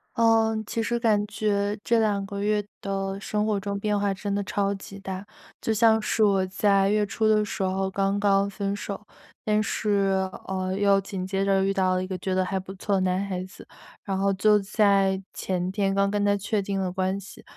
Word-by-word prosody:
呃， 225 -1 +3
其 230 - -2
实 235 +1 -1
感 215 -3 +2
觉 205 -1 -1
这 235 -1 +3
两 205 -2 +1
个 200 0 -5
月 210 0 +1 0.2
的 195 0 -3
生 210 +1 -1
活 210 -2 +1
中 200 0 -3
变 210 0 0
化 200 -1 +1
真 200 +1 -4
的 200 - -1
超 200 0 -1
级 195 0 -10
大。 190 0 -6 0.3
就 225 - -1
像 220 0 +4
是 220 +1 +1
我 195 -2 +3
在 195 +1 +2
月 210 +1 +2
初 215 +2 0
的 215 -1 +4
时 200 - -3
候 190 0 0
刚 195 +1 0
刚 200 -1 +3
分 200 0 -3
手， 205 0 -6 0.4
但 215 0 +2
是， 195 -3 0 0.2
哦， 185 -1 -2
又 200 -1 +4
紧 195 -1 -5
接 195 +1 -1
着 195 -1 +2
遇 195 - +1
到 185 -1 +2
了 185 - 0
一 - - -3
个 190 - -4
觉 185 +1 -2
得 185 0 +2
还 190 +1 -2
不 190 +1 -9
错 200 +1 -2
的 190 - +1
男 185 +1 0
孩 185 -2 -3
子， 185 - -13 0.4
然 195 - -2
后 195 +1 +2
就 210 +2 +4
在 195 -1 +2
前 185 -1 -2
天 195 -1 0
刚 200 0 +2
跟 205 0 0
他 205 0 +3
确 205 +1 -1
定 195 0 -2
了 185 -1 -1
关 190 +1 -1
系， 200 - -12
200 Hz, 235 characters per minute, -25 LUFS, 190-210 Hz, 0.4 s, 像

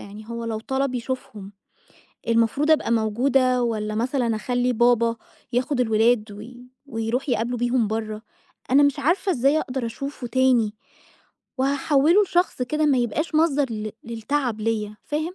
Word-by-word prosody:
يعني 205 +2 -10
هو 235 0 -5
لو 225 -1 -3
طلب 265 +2 -2
يشوفهم، 230 -5 -5 0.8
المفروض 230 +7 +2
أبقى 310 -6 +2
موجودة 250 +3 +2
والّا 215 -2 -2
مثلًا 240 0 0
أخلّي 245 +3 0
بابا 235 0 +3 0.4
ياخُد 255 +3 0
الولاد 220 -1 +2
وي 240 +4 -11 0.2
ويروح 235 +2 -3
يقابله 240 +1 -1
بيهم 240 -1 +1
برّه؟ 215 0 -4 0.5
أنا 280 +2 +6
مش 285 -1 +2
عارفة 370 +6 +1
إزاي 280 +2 +2
أقدر 255 -4 -3
أشوفه 255 +2 -6
تاني 245 -4 +2 0.9
وهاحوِّله 285 +6 +3
لشخص 355 -8 0
كده 305 +5 0
ما 275 -3 +3
يبقاش 270 +8 -2
مصدر 300 -3 +3
ل 215 -1 -4
للتعب 235 0 -2
ليّا، 215 -1 -2
فاهم؟ 310 +4 -3
245 Hz, 140 wpm, -23 LUFS, 225-275 Hz, 0.9 s, أنا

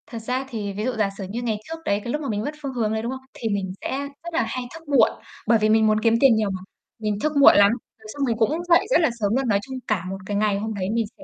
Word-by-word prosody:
Thật 230 - -7
ra 250 +4 -2
thì 210 -5 -4
ví 210 +2 -4
dụ 255 - +1
giả 210 -2 +2
sử 195 - -5
như 230 +4 -4
ngày 225 -3 -1
trước 325 - -4
đấy, 200 +1 +1
cái 240 - -3
lúc 300 - -2
mà 280 - -4
mình 210 -1 -1
mất 290 - -2
phương 275 -2 -4
hướng 220 -3 0
đấy, 220 - -1
đúng 235 +2 -3
không? 265 0 -6
Thì 225 - -3
mình 195 -2 -2
sẽ - - -2 0.3
rất 340 0 -7
là 325 - +2
hay 255 - -3
thức 325 -1 -12
muộn, 270 -6 +5 0.4
bởi 230 0 +5
vì 215 0 +2
mình 220 0 +4
muốn 215 0 +3
kiếm 225 +1 +3
tiền 270 -3 +6
nhiều 215 -2 +1
mà, 190 -1 -4 0.4
mình 210 -2 -2
thức 305 +4 -1
muộn 280 - +8
lắm, 200 0 +6
rồi 225 -2 -9
xong 290 - -7
mình 230 -4 0
cũng 295 +10 +1
dậy 345 +3 +5
rất - - +5
là 320 - +3
sớm 205 +1 +1
luôn. 265 0 0
Nói 200 -3 +3
chung 260 +4 -7
cả 195 -5 0
một 195 - -4
cái 205 +1 -2
ngày 205 -1 +1
hôm 220 +1 -3
đấy 195 -3 -3
mình 230 -1 +1
sẽ 290 - -14
225 Hz, 320 wpm, -23 LUFS, 210-265 Hz, 0.4 s, muộn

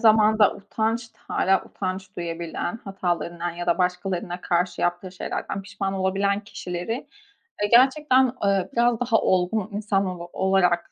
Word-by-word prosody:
zamanda 215 -2 +5
utanç 220 +3 -2
ta - - -33 0.2
hâlâ 190 0 +3
utanç 190 0 -5
duyabilen, 170 +3 -4
hatalarından 175 -3 -2
ya 175 +1 -6
da 170 +2 +2
başkalarına 180 -1 -1
karşı 175 0 0
yaptığı 175 +1 -1
şeylerden 195 +1 -4
pişman 200 0 -3
olabilen 195 +1 +1
kişileri, 180 +1 -5 0.7
eee, 205 - +3
gerçekten, 260 +2 +5 0.2
eee, 195 -2 +2
biraz 235 -1 +3
daha 235 -2 +2
olgun 185 +3 +1
insan 200 -1 0
olo 175 -2 -5
olarak 190 -2 +2
190 Hz, 135 wpm, -24 LUFS, 180-215 Hz, 0.7 s, zamanda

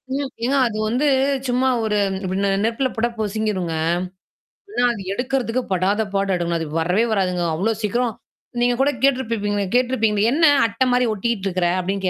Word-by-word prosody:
ம். 280 -1 -2 0.2
ஏன்னா 275 +2 +1
அது 215 - -5
வந்து 250 +6 0 0.4
சும்மா 255 +1 +2
ஒரு 210 -1 0 0.3
இப்டி 185 +1 -2 0.3
நெருப்புல 255 +3 0
பொட்டா 235 +2 0
பொசிங்கிருங்க. 210 -5 -2 1.0
ஆனா 335 - -1
அது 205 - -7
எடுக்கறிறதுக்கு 250 +1 -1
படாத 190 +4 +1
பாடு 195 0 0
எடுக்கணும். 170 -1 -1
அது 160 - -4
வரவே 180 +8 +2
வராதுங்க. 180 -3 0
அவ்ளோ 215 +7 0
சீக்கிரம். 235 +3 0 0.5
நீங்க 245 0 +3
கூட 285 - +3
கேட்டுருப்பப்பீங்களே 225 -7 +1
கேட்டுருப்பீங்களே. 225 -4 +2
என்ன 325 +3 +4 0.2
அட்ட 225 +4 0
மாரி 250 0 +3
ஒட்டிட்டு 210 -1 -2
இருக்கற? 180 -2 0
அப்டின்னு 195 +1 -2
220 Hz, 155 wpm, -21 LUFS, 195-245 Hz, 1.0 s, என்ன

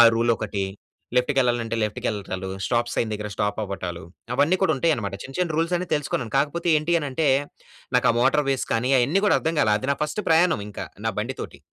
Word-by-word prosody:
Rule 115 +1 +3
ఒకటి. 100 -1 -2 0.5
లెఫ్ట్‌కి 125 +3 +2
వెళ్ళాలంటే, 120 -3 +1
లెఫ్ట్‌కి 105 -1 -2
వెళ్ళటాలు. 95 -3 -4 0.2
స్టాప్ 120 -1 0
సైన్ 110 -2 0
దగ్గర 105 0 -4
స్టాప్ 105 +1 -1
అవ్వటాలు. 90 -4 -5 0.3
అవన్నీ 160 +7 +3
కూడా - - +3
ఉంటాయన్నమాట. 125 -10 0
చిన్న, 135 - -9
చిన్న 170 -4 0
రూల్స్ 165 +2 +1
అన్ని 180 0 -4
తెలుసుకున్నాను. 135 -4 -3
కాకపోతే 160 +5 0
ఏంటి 165 +3 +1
అని 145 - -3
అంటే, 150 +3 +1 0.7
నాకు 125 - +4
ఆ - - -3
మోటార్‌వేస్ 135 -1 +2
కానీ, 125 +4 +1
అయన్నీ 155 +11 +2
కూడా - - +4
అర్థం 160 0 -1
కాలే. 105 - +3
అది 130 - -3
నా 140 - 0
ఫస్ట్ 150 +8 -3
ప్రయాణం 165 - +4
ఇంకా, 100 - -6 0.2
నా 110 - +2
బండి 130 +5 -3
తోటి. - - -8
130 Hz, 200 wpm, -24 LUFS, 110-155 Hz, 0.7 s, నాకు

